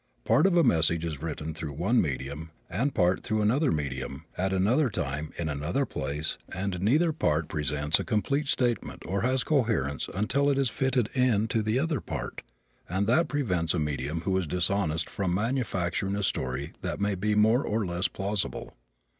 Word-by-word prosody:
Part -, -, +4 dB
of 180 Hz, -2 st, +2 dB
a 170 Hz, -, +6 dB
message 85 Hz, -, +3 dB
is 75 Hz, -4 st, -4 dB
written 80 Hz, -1 st, -4 dB
through 80 Hz, -2 st, -5 dB
one 100 Hz, -, +2 dB
medium 70 Hz, +2 st, -4 dB, 0.2 s
and 120 Hz, +11 st, 0 dB
part 90 Hz, -1 st, +3 dB
through 110 Hz, 0 st, 0 dB
another 135 Hz, +8 st, +3 dB
medium 70 Hz, -3 st, -3 dB
at 95 Hz, +1 st, 0 dB
another 115 Hz, +10 st, +3 dB
time 75 Hz, -5 st, -3 dB
in 85 Hz, -, -2 dB
another 75 Hz, -, -1 dB
place 75 Hz, -, -3 dB
and 95 Hz, -1 st, -3 dB
neither 155 Hz, -, +3 dB
part 75 Hz, -, +1 dB
presents 75 Hz, 0 st, 0 dB
a -, -, -1 dB
complete 140 Hz, +7 st, 0 dB
statement 120 Hz, -4 st, 0 dB
or 95 Hz, +2 st, -1 dB
has 130 Hz, +2 st, +1 dB
coherence 115 Hz, -, 0 dB
until 140 Hz, +8 st, +2 dB
it 140 Hz, -, +2 dB
is 135 Hz, -4 st, +1 dB
fitted 130 Hz, -4 st, 0 dB
into 115 Hz, -4 st, +2 dB
the 110 Hz, +3 st, 0 dB
other 150 Hz, -3 st, 0 dB
part; 70 Hz, -7 st, -5 dB, 0.5 s
and 95 Hz, +4 st, 0 dB
that 155 Hz, +10 st, +3 dB
prevents 90 Hz, -, 0 dB
a -, -, 0 dB
medium 75 Hz, +1 st, -2 dB
who 95 Hz, +2 st, 0 dB
is 90 Hz, -, -3 dB
dishonest 85 Hz, -2 st, 0 dB
from 95 Hz, -3 st, -1 dB
manufacturing 100 Hz, -5 st, -1 dB
a 105 Hz, -, -2 dB
story 65 Hz, -5 st, -2 dB
that -, -, -3 dB
may 100 Hz, 0 st, +1 dB
be 105 Hz, +3 st, 0 dB
more 110 Hz, +5 st, +4 dB
or 110 Hz, 0 st, 0 dB
less 90 Hz, +1 st, 0 dB
plausible. 95 Hz, -9 st, -3 dB
95 Hz, 180 wpm, -28 LUFS, 80-120 Hz, 0.5 s, a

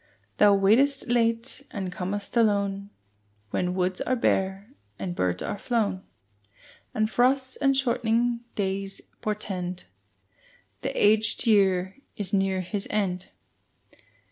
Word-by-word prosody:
Thou 205 Hz, -1 st, +6 dB
waitest 250 Hz, +8 st, +3 dB
late 230 Hz, +2 st, +1 dB
and 190 Hz, -3 st, -4 dB
com'st 200 Hz, +4 st, -4 dB
alone, 200 Hz, -3 st, +1 dB, 0.6 s
When 180 Hz, 0 st, -1 dB
woods 185 Hz, 0 st, -1 dB
are 255 Hz, -, +1 dB
bare 195 Hz, -1 st, 0 dB, 0.3 s
and 180 Hz, -2 st, -4 dB
birds 90 Hz, -, -1 dB
are 205 Hz, -, -4 dB
flown, 215 Hz, -6 st, 0 dB, 0.9 s
And 215 Hz, 0 st, +1 dB
frosts 260 Hz, +3 st, +1 dB
and 275 Hz, -2 st, +2 dB
shortening 235 Hz, -2 st, +1 dB, 0.2 s
days 195 Hz, -1 st, -3 dB, 0.2 s
portend 185 Hz, -4 st, -3 dB, 1.0 s
The -, -, -2 dB
aged 215 Hz, +3 st, +4 dB
year 190 Hz, -2 st, +3 dB, 0.2 s
is 200 Hz, -2 st, -1 dB
near 195 Hz, -1 st, +1 dB
his 195 Hz, +3 st, -3 dB
end. 190 Hz, -3 st, -1 dB
205 Hz, 115 wpm, -26 LUFS, 190-230 Hz, 1.0 s, Thou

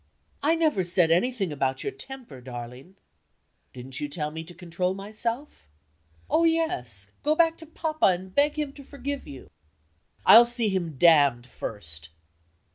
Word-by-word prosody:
"I 320 Hz, +3 st, +3 dB
never 310 Hz, -, +1 dB
said 175 Hz, -1 st, +3 dB
anything 195 Hz, 0 st, +1 dB
about 135 Hz, -2 st, -1 dB
your -, -, -2 dB
temper, 235 Hz, -, -9 dB
darling." 125 Hz, +7 st, -9 dB, 0.8 s
"Didn't 130 Hz, +1 st, -7 dB
you 145 Hz, -, -3 dB
tell 150 Hz, 0 st, -3 dB
me 160 Hz, +1 st, -6 dB
to 175 Hz, +1 st, -11 dB
control 180 Hz, +1 st, -2 dB
myself?" 220 Hz, -, -4 dB, 0.6 s
"Oh, 325 Hz, -, +2 dB
yes! 125 Hz, -, 0 dB
Go 305 Hz, +1 st, +2 dB
back 330 Hz, 0 st, +3 dB
to 320 Hz, -, -10 dB
Papa, 315 Hz, 0 st, 0 dB
and 185 Hz, 0 st, -1 dB
beg 290 Hz, +4 st, +2 dB
him 295 Hz, -2 st, -2 dB
to 280 Hz, -, -12 dB
forgive 280 Hz, +1 st, -6 dB
you." 135 Hz, -2 st, -11 dB, 0.7 s
"I'll 235 Hz, -, +10 dB
see 240 Hz, -2 st, +1 dB
him 175 Hz, -7 st, -2 dB
damned 145 Hz, -7 st, +5 dB
first!" 80 Hz, -10 st, -7 dB
185 Hz, 150 wpm, -26 LUFS, -, 0.8 s, I'll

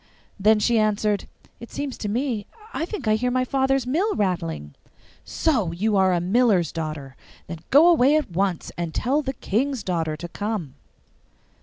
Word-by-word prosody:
Then 215 Hz, +2 st, +5 dB
she 230 Hz, +1 st, +2 dB
answered, 210 Hz, -1 st, 0 dB, 0.3 s
'It 235 Hz, -, -10 dB
seems 285 Hz, -2 st, -4 dB
so -, -, -12 dB
to 210 Hz, -, -3 dB
me; 235 Hz, -2 st, -2 dB, 0.3 s
I 325 Hz, -, -2 dB
think 360 Hz, -, -6 dB
I 215 Hz, -, +4 dB
hear 250 Hz, +4 st, +1 dB
my 255 Hz, +1 st, +1 dB
father's 270 Hz, 0 st, +1 dB
mill 355 Hz, -, 0 dB
rattling.' 80 Hz, -, -2 dB, 0.5 s
'So 235 Hz, -, 0 dB
you 205 Hz, +5 st, 0 dB
are 190 Hz, -1 st, +4 dB
a 175 Hz, -, +2 dB
miller's 190 Hz, -2 st, +2 dB
daughter! 155 Hz, -5 st, -5 dB, 0.3 s
Then 165 Hz, 0 st, -7 dB
go 295 Hz, +5 st, +7 dB
away 295 Hz, -4 st, +5 dB
at 305 Hz, -11 st, 0 dB
once, 185 Hz, 0 st, -1 dB
and 170 Hz, -2 st, -3 dB
tell 275 Hz, +5 st, +1 dB
the 265 Hz, -2 st, -3 dB
King's 250 Hz, +2 st, -1 dB
daughter 165 Hz, -5 st, -2 dB
to 175 Hz, +3 st, -6 dB
come. 200 Hz, -6 st, -4 dB
215 Hz, 175 wpm, -23 LUFS, 175-260 Hz, 0.5 s, go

